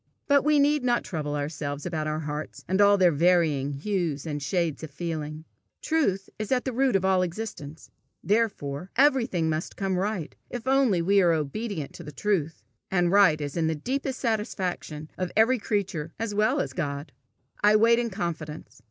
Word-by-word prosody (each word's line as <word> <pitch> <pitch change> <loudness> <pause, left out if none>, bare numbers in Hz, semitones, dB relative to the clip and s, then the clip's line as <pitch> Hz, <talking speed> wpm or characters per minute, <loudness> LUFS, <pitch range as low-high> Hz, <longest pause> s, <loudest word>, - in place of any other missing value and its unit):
But 280 -1 +4
we 300 +1 +4
need 290 0 +3
not 240 -1 +2
trouble 150 -4 -3
ourselves 145 -1 -4
about 160 -3 -2
our 155 +1 -2
hearts, 150 0 -6
and 190 +3 +2
all 205 0 +6
their 180 -3 +5
varying 155 -3 +2
hues 165 -2 -2
and 145 -2 -3
shades 165 +1 -1
of 160 - -6
feeling. 155 0 -5 0.3
Truth 200 - 0
is 215 +2 -4
at 255 -1 +1
the 260 - -2
root 260 -1 +2
of 190 -1 +2
all 190 -1 +3
existence, 170 -5 -6 0.3
therefore 190 -7 -1
everything 245 - +3
must 155 +1 -2
come 190 -2 -1
right 195 -5 -3
if 245 0 -6
only 260 -10 +3
we 200 +3 +4
are 175 -2 +4
obedient 160 +2 -3
to 175 - -10
the 150 - -8
truth; 160 - -1 0.3
and 175 -2 +2
right 195 -6 +5
is 145 -1 -4
the 160 -1 0
deepest 265 - -3
satisfaction 190 - -3
of 185 -1 -2
every 235 +3 +4
creature 190 -7 -2
as 225 -1 -3
well 215 +7 +2
as - - -2
of - - -18
God. 145 -2 -3 0.5
I 210 +1 +6
wait 230 +2 +5
in 240 -1 -1
confidence. 160 -7 -5
180 Hz, 180 wpm, -26 LUFS, 155-220 Hz, 0.5 s, all